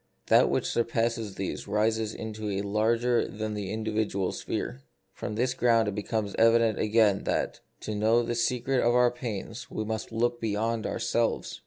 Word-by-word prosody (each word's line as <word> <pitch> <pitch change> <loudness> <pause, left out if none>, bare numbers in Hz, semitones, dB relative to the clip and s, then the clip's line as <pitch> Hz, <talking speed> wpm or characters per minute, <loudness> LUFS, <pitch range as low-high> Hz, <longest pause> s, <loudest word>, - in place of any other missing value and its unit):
That - - +6
which - - 0
surpasses 115 -3 -1
these 95 +1 -4
rises 110 +1 0
into 110 -1 -5
a 100 0 -1
larger 115 +4 +1
than 110 0 -4
the 100 -2 -4
individual 110 -3 -1
sphere. 65 - -4 0.3
From 105 - -5
this 125 +3 +1
ground 115 -3 +3
it 105 - -1
becomes 105 0 -2
evident 115 -2 +4
again 105 -2 +3
that, - - -1 0.2
to 110 - -4
know 110 +3 +3
the 120 - -2
secret 125 +2 +1
of 120 +1 +3
our 125 -1 +5
pains, 115 -1 -6
we 110 - -3
must 110 +1 -4
look 120 +1 0
beyond 110 +1 -1
ourselves. 115 -1 -1
110 Hz, 165 wpm, -28 LUFS, 105-115 Hz, 0.3 s, That